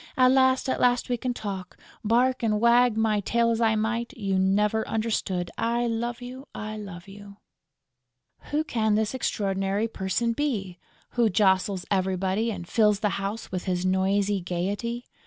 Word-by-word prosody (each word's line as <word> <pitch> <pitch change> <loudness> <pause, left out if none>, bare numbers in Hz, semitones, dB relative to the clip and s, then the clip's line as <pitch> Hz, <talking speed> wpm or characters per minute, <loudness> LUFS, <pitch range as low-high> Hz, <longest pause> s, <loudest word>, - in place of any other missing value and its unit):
At 255 -1 +6
last, 260 0 +3
at 260 - 0
last 245 0 +2
we 245 - +1
can 250 +2 -2
talk!... 195 -6 -6 0.3
Bark 245 +4 +2
and 215 -2 +1
wag 235 0 +4
my 220 -1 +2
tail 230 +3 +1
as 230 0 -1
I 220 -1 +3
might, 230 +3 -2
you 195 -3 0
never 210 +3 +2
understood!... 205 -5 -1
I 235 +1 +1
love 235 +1 -2
you! 255 +3 -9
I 215 0 -5
love 195 -4 -8
you!" 200 0 -12 1.1
Who 300 +1 +1
can 220 -7 0
this 215 +1 0
extraordinary 195 -3 -1
person 225 +3 -1
be, 210 -10 -2 0.3
who 235 -2 +2
jostles 190 -1 +2
everybody 190 +3 0
and 180 -6 -5
fills 210 -1 +3
the 210 - +2
house 205 +4 -4
with 185 -1 -4
his 180 -1 -1
noisy 195 +1 +1
gaiety? 200 +8 -3
215 Hz, 160 wpm, -26 LUFS, 195-235 Hz, 1.1 s, At